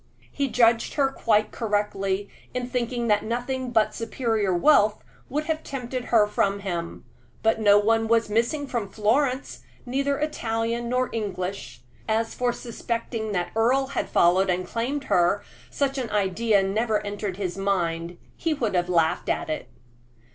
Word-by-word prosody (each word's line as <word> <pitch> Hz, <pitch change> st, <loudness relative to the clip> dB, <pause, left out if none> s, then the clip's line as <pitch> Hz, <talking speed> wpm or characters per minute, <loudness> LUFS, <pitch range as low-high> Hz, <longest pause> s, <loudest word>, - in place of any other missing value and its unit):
He 280 Hz, -1 st, -1 dB
judged 230 Hz, -2 st, +3 dB
her 275 Hz, -2 st, +2 dB
quite 215 Hz, -4 st, +1 dB
correctly 205 Hz, -2 st, -1 dB, 0.3 s
in 250 Hz, -1 st, -2 dB
thinking 245 Hz, -1 st, -2 dB
that 210 Hz, -2 st, +2 dB
nothing 245 Hz, +3 st, -2 dB
but 225 Hz, -3 st, +2 dB
superior 225 Hz, -3 st, -1 dB
wealth 210 Hz, -, +4 dB, 0.3 s
would 300 Hz, +3 st, -1 dB
have 315 Hz, 0 st, -2 dB
tempted 255 Hz, -3 st, -5 dB
her 220 Hz, -3 st, +4 dB
from 200 Hz, -1 st, 0 dB
him; 170 Hz, -7 st, -4 dB, 0.4 s
but 225 Hz, 0 st, +2 dB
no 205 Hz, -1 st, +6 dB
one 225 Hz, +2 st, +2 dB
was 230 Hz, 0 st, +3 dB
missing 235 Hz, +8 st, 0 dB
from 235 Hz, -7 st, -3 dB
Florence, 250 Hz, +6 st, 0 dB, 0.2 s
neither 275 Hz, +3 st, 0 dB
Italian 235 Hz, -5 st, -2 dB
nor 255 Hz, +1 st, 0 dB
English. 185 Hz, -, -4 dB, 0.3 s
As 225 Hz, +1 st, 0 dB
for 245 Hz, -1 st, 0 dB
suspecting 230 Hz, -2 st, -4 dB
that 175 Hz, -2 st, -1 dB
Earle 260 Hz, +4 st, +2 dB
had -, -, -2 dB
followed 185 Hz, +3 st, +4 dB
and 180 Hz, 0 st, 0 dB
claimed 250 Hz, +8 st, -2 dB
her, 175 Hz, 0 st, +2 dB, 0.3 s
such 275 Hz, -1 st, -1 dB
an 245 Hz, -3 st, -3 dB
idea 205 Hz, +1 st, +2 dB
never 210 Hz, +2 st, 0 dB
entered 205 Hz, -2 st, -4 dB
his 185 Hz, -3 st, -3 dB
mind; 175 Hz, -3 st, -1 dB, 0.2 s
he 325 Hz, -2 st, -1 dB
would 230 Hz, -8 st, -1 dB
have 180 Hz, -1 st, +1 dB
laughed 165 Hz, -3 st, +1 dB
at -, -, -1 dB
it. 155 Hz, -, -4 dB
225 Hz, 155 wpm, -25 LUFS, 200-245 Hz, 0.4 s, no